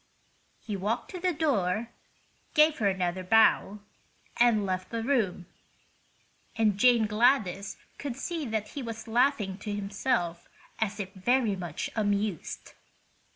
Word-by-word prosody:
He 210 Hz, -, -5 dB
walked 210 Hz, +5 st, -2 dB
to 365 Hz, -, -6 dB
the 365 Hz, +1 st, +1 dB
door, 235 Hz, -, 0 dB, 0.6 s
gave 305 Hz, 0 st, +5 dB
her 210 Hz, -, +2 dB
another 185 Hz, -1 st, -1 dB
bow, 210 Hz, 0 st, +3 dB, 0.6 s
and 235 Hz, -4 st, +4 dB
left 185 Hz, -1 st, -3 dB
the 230 Hz, -1 st, -3 dB
room, 225 Hz, -9 st, 0 dB, 1.1 s
and 215 Hz, -3 st, +3 dB
Jane 240 Hz, -1 st, +5 dB
Gladys 210 Hz, -3 st, +1 dB, 0.2 s
could 280 Hz, -4 st, -4 dB
see 325 Hz, +4 st, -4 dB
that 220 Hz, -2 st, -2 dB
he 285 Hz, -, -6 dB
was 230 Hz, -2 st, -6 dB
laughing 225 Hz, -5 st, +1 dB
to 210 Hz, -, -5 dB
himself 200 Hz, -3 st, -2 dB, 0.3 s
as 215 Hz, -1 st, -1 dB
if 195 Hz, -1 st, -5 dB
very 225 Hz, +2 st, +1 dB
much 175 Hz, -5 st, -5 dB
amused. 205 Hz, -4 st, -2 dB
215 Hz, 130 wpm, -28 LUFS, 195-245 Hz, 1.1 s, gave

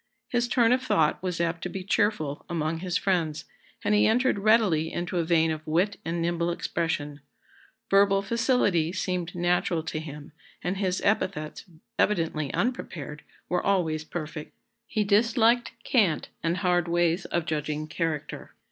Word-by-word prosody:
His 240 Hz, -1 st, +1 dB
turn 240 Hz, -1 st, +3 dB
of 255 Hz, +1 st, +3 dB
thought 200 Hz, -11 st, +2 dB
was 180 Hz, -2 st, -3 dB
apt 170 Hz, 0 st, -1 dB
to -, -, -3 dB
be 190 Hz, -1 st, -5 dB
cheerful 185 Hz, -7 st, 0 dB
among 160 Hz, -1 st, -1 dB
his 180 Hz, +1 st, -1 dB
friends, 165 Hz, -6 st, 0 dB, 0.4 s
and 210 Hz, -, +2 dB
he 210 Hz, -, +5 dB
entered 245 Hz, 0 st, +2 dB
readily 195 Hz, -7 st, +3 dB
into 175 Hz, +1 st, -2 dB
a -, -, +2 dB
vein 165 Hz, -1 st, +3 dB
of 155 Hz, -1 st, -3 dB
wit 180 Hz, +6 st, +1 dB
and 170 Hz, +1 st, -2 dB
nimble 170 Hz, 0 st, 0 dB
expression. 165 Hz, -4 st, -2 dB, 0.7 s
Verbal 195 Hz, 0 st, +4 dB
facility 205 Hz, -7 st, +2 dB
seemed 180 Hz, -2 st, -2 dB
natural 175 Hz, -1 st, +1 dB
to 160 Hz, 0 st, -3 dB
him, 150 Hz, -1 st, -9 dB, 0.3 s
and 180 Hz, +2 st, -1 dB
his 190 Hz, -2 st, -1 dB
epithets, 185 Hz, -7 st, -1 dB, 0.3 s
evidently 160 Hz, -7 st, +1 dB
unprepared, 155 Hz, -, -3 dB, 0.3 s
were 180 Hz, -, 0 dB
always 165 Hz, -6 st, +1 dB
perfect. 155 Hz, -1 st, -6 dB, 0.3 s
He 215 Hz, -2 st, 0 dB
disliked 230 Hz, +3 st, +3 dB
cant 195 Hz, -, +2 dB
and 165 Hz, +2 st, 0 dB
hard 180 Hz, -2 st, +1 dB
ways 170 Hz, +1 st, +1 dB
of 170 Hz, -2 st, -1 dB
judging 150 Hz, -1 st, -2 dB
character. 160 Hz, -1 st, -4 dB
175 Hz, 150 wpm, -27 LUFS, 160-200 Hz, 0.7 s, he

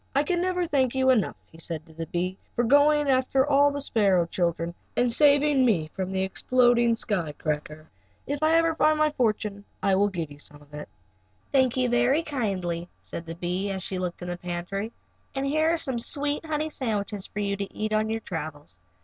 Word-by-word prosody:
"I 280 Hz, -, +4 dB
never 360 Hz, 0 st, 0 dB
can 345 Hz, -, -1 dB
thank 265 Hz, -3 st, +1 dB
you 260 Hz, 0 st, +4 dB
enough," 220 Hz, -7 st, +1 dB, 0.2 s
he 165 Hz, -, -15 dB
said 160 Hz, -1 st, -5 dB
to 160 Hz, -, -17 dB
the 165 Hz, 0 st, -6 dB
bee, 180 Hz, +2 st, -2 dB, 0.2 s
"for 240 Hz, -, +2 dB
going 290 Hz, +4 st, +4 dB
after 265 Hz, 0 st, +3 dB
the 285 Hz, 0 st, +3 dB
sparrow 200 Hz, -10 st, +2 dB
children 170 Hz, 0 st, -1 dB, 0.2 s
and 245 Hz, 0 st, +3 dB
saving 285 Hz, +1 st, +4 dB
me 170 Hz, -11 st, +1 dB
from 190 Hz, -1 st, -3 dB
the 190 Hz, 0 st, 0 dB
exploding 240 Hz, +3 st, +3 dB
sky 185 Hz, -9 st, -2 dB
cracker. 150 Hz, +1 st, -4 dB, 0.4 s
If 285 Hz, +1 st, -3 dB
ever 330 Hz, +1 st, +4 dB
I -, -, -3 dB
find 310 Hz, 0 st, +3 dB
my 305 Hz, 0 st, +3 dB
fortune 215 Hz, -6 st, -1 dB, 0.2 s
I 195 Hz, 0 st, +3 dB
will 200 Hz, +2 st, +4 dB
give 170 Hz, -6 st, -4 dB
you 145 Hz, -, -12 dB
some 145 Hz, 0 st, -11 dB
of 145 Hz, 0 st, -21 dB
it." 150 Hz, 0 st, -7 dB, 0.6 s
"Thank 260 Hz, -2 st, +3 dB
you 255 Hz, -1 st, +2 dB
very 245 Hz, +6 st, +2 dB
kindly," 185 Hz, -, -2 dB
said 165 Hz, -, -7 dB
the 165 Hz, -, -6 dB
bee, 180 Hz, +3 st, -2 dB
as 190 Hz, -2 st, -3 dB
she 190 Hz, -1 st, -4 dB
looked 180 Hz, -1 st, -4 dB
in 180 Hz, -, -5 dB
the 175 Hz, -, -3 dB
pantry, 180 Hz, +5 st, -4 dB, 0.4 s
"and 270 Hz, 0 st, -1 dB
here 310 Hz, +3 st, +2 dB
are 335 Hz, -, +1 dB
some 265 Hz, -7 st, -2 dB
sweet 290 Hz, +5 st, -1 dB
honey 310 Hz, 0 st, -1 dB
sandwiches 210 Hz, -7 st, -3 dB
for -, -, -13 dB
you 200 Hz, -1 st, 0 dB
to 200 Hz, 0 st, -5 dB
eat 215 Hz, 0 st, -3 dB
on 215 Hz, 0 st, +1 dB
your 225 Hz, 0 st, -2 dB
travels. 150 Hz, -, -7 dB
215 Hz, 205 wpm, -26 LUFS, 175-275 Hz, 0.6 s, I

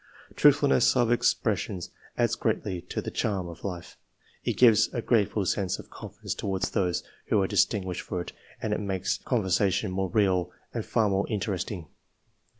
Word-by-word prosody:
Truthfulness 65 Hz, -, +5 dB
of 120 Hz, -1 st, +3 dB
expres 120 Hz, -4 st, +2 dB
sion 95 Hz, -4 st, -4 dB, 0.4 s
adds -, -, +2 dB
greatly 90 Hz, -2 st, -1 dB
to -, -, -3 dB
the -, -, -4 dB
charm 95 Hz, -4 st, -1 dB
of 85 Hz, -1 st, -10 dB
life; 90 Hz, -3 st, -6 dB, 0.5 s
it -, -, 0 dB
gives 115 Hz, -4 st, +6 dB
a -, -, 0 dB
grateful 105 Hz, -3 st, +2 dB
sense 95 Hz, 0 st, 0 dB
of -, -, -12 dB
confidence -, -, -6 dB
towards 95 Hz, -2 st, -2 dB
those 90 Hz, -2 st, 0 dB, 0.2 s
who 105 Hz, -, +3 dB
are 95 Hz, -, +2 dB
distinguished 95 Hz, -4 st, +1 dB
for 90 Hz, -, -4 dB
it 85 Hz, -, -5 dB, 0.3 s
and 110 Hz, -, -1 dB
it -, -, -1 dB
makes 95 Hz, -2 st, -1 dB
con 120 Hz, -5 st, 0 dB
versation 95 Hz, +2 st, +1 dB
more 95 Hz, 0 st, -1 dB
real 95 Hz, -4 st, +2 dB, 0.2 s
and -, -, -4 dB
far 110 Hz, -2 st, +2 dB
more 100 Hz, 0 st, 0 dB
interesting. 100 Hz, -4 st, -3 dB
95 Hz, 170 wpm, -27 LUFS, 90-105 Hz, 0.5 s, gives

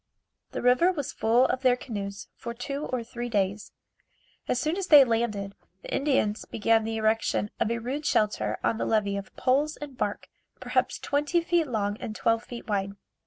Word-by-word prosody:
The -, -, -5 dB
river 250 Hz, +9 st, +5 dB
was 290 Hz, -7 st, -4 dB
full 235 Hz, +3 st, +3 dB
of 255 Hz, 0 st, -1 dB
their 255 Hz, -2 st, +4 dB
canoes 200 Hz, -5 st, -6 dB
for 235 Hz, 0 st, -7 dB
two 275 Hz, +4 st, -4 dB
or 250 Hz, -2 st, -2 dB
three 240 Hz, +1 st, -6 dB
days. 200 Hz, -1 st, -1 dB, 0.8 s
As 250 Hz, -, +1 dB
soon 310 Hz, +5 st, 0 dB
as 385 Hz, -1 st, -3 dB
they 295 Hz, -3 st, +9 dB
landed, 225 Hz, -5 st, -1 dB, 0.3 s
the -, -, -6 dB
Indians 265 Hz, -7 st, +1 dB
began 225 Hz, 0 st, +2 dB
the 225 Hz, 0 st, -2 dB
erection 220 Hz, -1 st, +1 dB
of -, -, +1 dB
a 235 Hz, -, 0 dB
rude 265 Hz, +6 st, -3 dB
shelter 210 Hz, -1 st, +1 dB
on 225 Hz, -, +1 dB
the -, -, 0 dB
levee 205 Hz, -2 st, +1 dB
of 195 Hz, -1 st, -8 dB
poles 285 Hz, +4 st, +1 dB
and 290 Hz, -3 st, -8 dB
bark, 205 Hz, -4 st, -3 dB, 0.3 s
perhaps -, -, 0 dB
twenty 295 Hz, +4 st, 0 dB
feet 335 Hz, -2 st, +1 dB
long 205 Hz, -4 st, -1 dB
and 215 Hz, -, -6 dB
twelve 230 Hz, +1 st, +1 dB
feet 240 Hz, -1 st, -9 dB
wide. 200 Hz, -2 st, -1 dB
235 Hz, 185 wpm, -27 LUFS, 215-275 Hz, 0.8 s, they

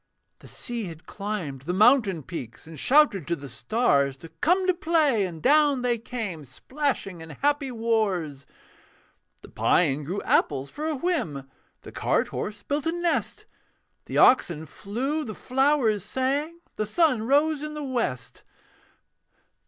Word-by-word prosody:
The -, -, -14 dB
sea 240 Hz, -4 st, -5 dB
had 165 Hz, -3 st, -10 dB
climbed 195 Hz, -10 st, -5 dB
the 175 Hz, +6 st, -3 dB
mountain 210 Hz, -, +4 dB
peaks, 125 Hz, -8 st, -8 dB
And 160 Hz, -2 st, -10 dB
shouted 265 Hz, -, +4 dB
to 170 Hz, -, 0 dB
the 140 Hz, -3 st, -9 dB
stars 140 Hz, -, +1 dB
To 165 Hz, -, -12 dB
come 360 Hz, -, +1 dB
to 370 Hz, -, +3 dB
play: 310 Hz, -, +2 dB
and 165 Hz, -3 st, -10 dB
down 290 Hz, -2 st, +4 dB
they 240 Hz, -2 st, +1 dB
came 215 Hz, -9 st, -5 dB
Splashing 195 Hz, -, -3 dB
in 160 Hz, -, -10 dB
happy 285 Hz, -, 0 dB
wars. 205 Hz, -, -1 dB, 1.0 s
The -, -, -12 dB
pine 150 Hz, -4 st, +2 dB
grew 180 Hz, +8 st, -3 dB
apples 140 Hz, -2 st, +1 dB
for 305 Hz, +2 st, -4 dB
a 315 Hz, -, -1 dB
whim, 215 Hz, -, -2 dB, 0.3 s
The -, -, -11 dB
cart -, -, 0 dB
horse 205 Hz, -1 st, -5 dB
built 290 Hz, +2 st, -2 dB
a -, -, +2 dB
nest; 345 Hz, 0 st, -2 dB, 0.6 s
The -, -, -4 dB
oxen 170 Hz, -11 st, +4 dB
flew, 255 Hz, -, -3 dB
the 215 Hz, -6 st, -7 dB
flowers 260 Hz, -6 st, +2 dB
sang, 280 Hz, +9 st, -2 dB, 0.2 s
The 215 Hz, -, -1 dB
sun 255 Hz, -4 st, +2 dB
rose 295 Hz, +2 st, +2 dB
in 305 Hz, 0 st, -5 dB
the 300 Hz, -, -5 dB
west. 235 Hz, -, -3 dB
225 Hz, 150 wpm, -25 LUFS, -, 1.0 s, mountain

